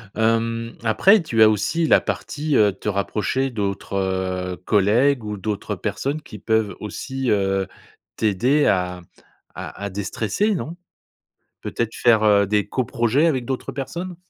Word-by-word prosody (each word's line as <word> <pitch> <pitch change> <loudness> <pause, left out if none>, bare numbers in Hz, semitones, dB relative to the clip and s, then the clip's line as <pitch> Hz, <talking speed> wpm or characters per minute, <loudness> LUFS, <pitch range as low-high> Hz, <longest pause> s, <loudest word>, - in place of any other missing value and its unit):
Hem, 115 +1 0
après, 185 - +5
tu 115 -7 0
as 110 - +9
aussi 110 - 0
la - - +5
partie, 150 -1 -2
heu, 105 -3 +4
te 100 - -4
rapprocher 105 +6 -1
d'autres, 100 -4 -4
heu, 95 -1 -2
collègues 115 +6 +3
ou 105 -1 -4
d'autres 105 0 -3
personnes 145 +3 -3
qui 105 - -11
peuvent 110 0 0
aussi, 130 +5 -4
heu, 95 -2 +1 0.5
t'aider 120 +8 +2
à 90 -1 0 0.6
à 100 - -7
à - - -3
déstresser, 105 - -1
non? 170 -2 -4 0.9
Peut-être 115 -1 -3
faire, 115 -3 +3
heu, 100 -1 +5
des 105 0 0
co-projets 130 +3 +1
avec 130 -7 0
d'autres 130 +1 -4
personnes? 170 +7 -5
110 Hz, 145 wpm, -22 LUFS, 100-135 Hz, 0.9 s, as